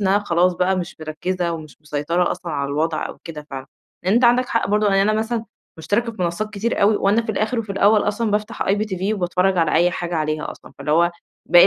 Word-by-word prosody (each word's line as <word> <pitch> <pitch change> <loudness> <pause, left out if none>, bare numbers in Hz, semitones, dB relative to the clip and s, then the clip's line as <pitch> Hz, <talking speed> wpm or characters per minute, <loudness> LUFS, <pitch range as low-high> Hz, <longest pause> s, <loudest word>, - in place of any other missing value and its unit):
إن 200 - 0
أنا 200 +2 +4
خلاص 180 -2 +2
بقى 185 +1 +1
مش 180 0 -4
مركِّزة 170 +3 -2
ومش 155 -3 -8
مسيطرة 150 +4 0
أصلًا 170 -3 -4
على 140 -1 -1
الوضع 155 +3 -1
أو - - -10
كده 150 -3 -8
فعلًا. 135 -1 -6 0.4
لإن 190 - +2
أنت 240 +1 +4
عندك 245 +1 +4
حق 230 - 0
برضه، 210 +1 +2
يعني 195 -1 +4
أنا 215 +2 +2
مثلًا 225 0 -2 0.3
مُشتَرِكة 230 +7 0
في 195 -5 -5
منصّات 175 +5 -2
كتير 215 +1 -1
أوي 205 +1 +5
وأنا 205 +4 +2
في 220 - -3
الآخِر 220 +4 -1
وفي 210 -3 -3
الأول 205 +2 +4
أصلًا 215 +1 -1
بافتح 210 +1 -1
IPTV 200 0 0
وباتفرّج 180 0 +1
على 165 - +2
أي 175 +1 +4
حاجة 175 -1 -3
عليها 155 -1 -2
أصلًا، - - -12
فاللي 150 - -3
هو 170 +2 +4 0.4
باقي 175 +1 +8
185 Hz, 225 wpm, -21 LUFS, 170-210 Hz, 0.4 s, باقي